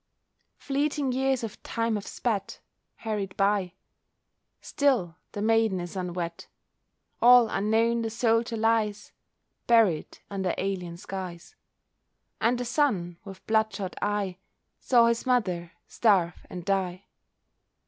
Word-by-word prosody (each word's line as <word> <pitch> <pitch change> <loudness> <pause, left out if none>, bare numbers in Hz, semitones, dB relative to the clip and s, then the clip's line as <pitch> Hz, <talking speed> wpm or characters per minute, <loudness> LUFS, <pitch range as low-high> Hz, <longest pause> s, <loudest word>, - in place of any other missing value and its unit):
Fleeting 285 0 -1
years 265 -1 0
of 225 - -6
time 230 -1 -1
have 205 -2 -3
sped—hurried 210 -2 -4
by— 195 -2 +1 0.9
Still 245 - +1 0.2
the 205 - -3
maiden 225 -3 +2
is 175 +1 -6
unwed: 175 -2 -4 0.8
All 245 0 +8
unknown 225 +3 +1
the 225 - -2
soldier 230 0 +1
lies, 220 -2 0 0.6
Buried 220 -9 +3
under 190 -2 -2
alien 180 -3 -3
skies; 185 - -7 0.8
And 240 +2 +2
the 245 - -3
son, 200 - 0
with 195 -2 -11
blood 220 0 +2
shot 190 -3 -5
eye, 205 -3 -1 0.4
Saw 240 -2 +4
his 235 +2 0
mother 185 -9 0
starve 190 -6 +1
and 180 -2 -7
die. 190 -1 -1
210 Hz, 115 wpm, -27 LUFS, 185-230 Hz, 0.9 s, All